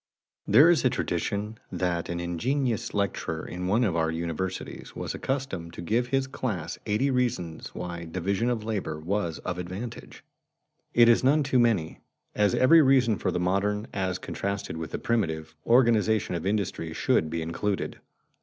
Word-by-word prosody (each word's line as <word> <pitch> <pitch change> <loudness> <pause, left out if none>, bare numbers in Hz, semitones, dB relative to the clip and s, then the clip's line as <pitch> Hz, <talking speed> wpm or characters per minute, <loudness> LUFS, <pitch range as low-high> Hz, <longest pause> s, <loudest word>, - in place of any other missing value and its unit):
_ - - -1
There 145 +11 +8
is 170 - +2
a 130 - +4
tradition 105 -1 -2
that 90 -2 -1
an 85 0 -2
ingenious 115 - -1
lecturer 100 -5 -2
in 90 +1 -4
one 110 +6 +3
of 95 -7 +1
our 80 -1 +1
universities 85 +3 -4
was - - -4
accustomed 130 -12 -3
to - - -7
give 115 +7 +1
to 125 - -15
his 135 0 +2
class 105 -11 -4
eighty 115 +7 +1
reasons 115 -11 -2
why 85 -1 -5
division 95 +7 -1
of 115 -3 -1
labor 100 -8 -3
was 85 0 -2
of 90 0 -3
advantage. 90 - -7 0.7
It 120 -1 +7
is 120 +1 +5
none 145 +3 +4
too 135 -2 +2
many, 110 -10 +1 0.3
as 105 -2 +2
every 160 +6 +7
reason 130 -6 +4
for - - 0
the - - -1
modern, 100 +4 0
as 95 -2 -1
contrasted 100 0 -4
with 80 -1 -5
the - - -3
primitive, 80 -9 -1
organization 110 -5 +3
of 85 +1 -2
industry 95 -5 -1
should 80 -1 +1
be 80 0 -2
included. 95 +5 -2
100 Hz, 170 wpm, -27 LUFS, 85-120 Hz, 0.7 s, There